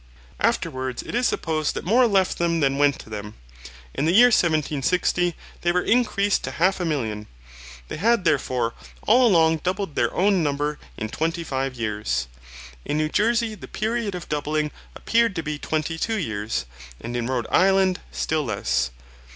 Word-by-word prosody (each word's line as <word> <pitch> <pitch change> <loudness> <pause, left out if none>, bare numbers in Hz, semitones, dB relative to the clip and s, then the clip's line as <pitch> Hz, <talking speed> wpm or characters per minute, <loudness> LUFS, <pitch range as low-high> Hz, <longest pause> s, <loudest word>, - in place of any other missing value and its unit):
Afterwards, 130 -1 -1
it - - -8
is 245 +1 +2
supposed 155 -2 -1
that - - -5
more 240 +6 +4
left 195 -3 +1
them 170 -1 +1
than 140 -2 +1
went 145 -1 +3
to - - -15
them. 105 0 -6 0.6
In 140 - -1
the 165 - +3
year 240 +7 +7
1760, 170 - +1 0.3
they 175 - +2
were 180 +1 +1
increased 210 -4 +2
to - - -3
half 185 +4 +1
a 180 - -1
million. 110 -9 -2 0.6
They - - -6
had 225 +3 +2
therefore 125 -7 +1 0.3
all 245 +3 +5
along 165 -5 +4
doubled 185 +1 -3
their - - +1
own 195 0 +3
number 145 0 -1 0.2
in 110 - -4
twenty 165 +5 -2
five 135 -3 -3
years. 105 - -2 0.6
In 150 - -2
New 155 0 0
Jersey 230 +4 +1
the 210 - -10
period 220 -2 -2
of 175 - -7
doubling 150 0 -1 0.2
appeared 230 -3 +1
to 165 - -2
be 150 -1 -4
twenty 160 +2 -2
two 225 +4 -1
years; 110 - -2 0.3
and 120 +1 -6
in 120 -1 -1
Rhode 125 -3 -1
island 190 -1 +3
still 155 -2 -1
less. 65 - 0
160 Hz, 170 wpm, -23 LUFS, 135-195 Hz, 0.6 s, year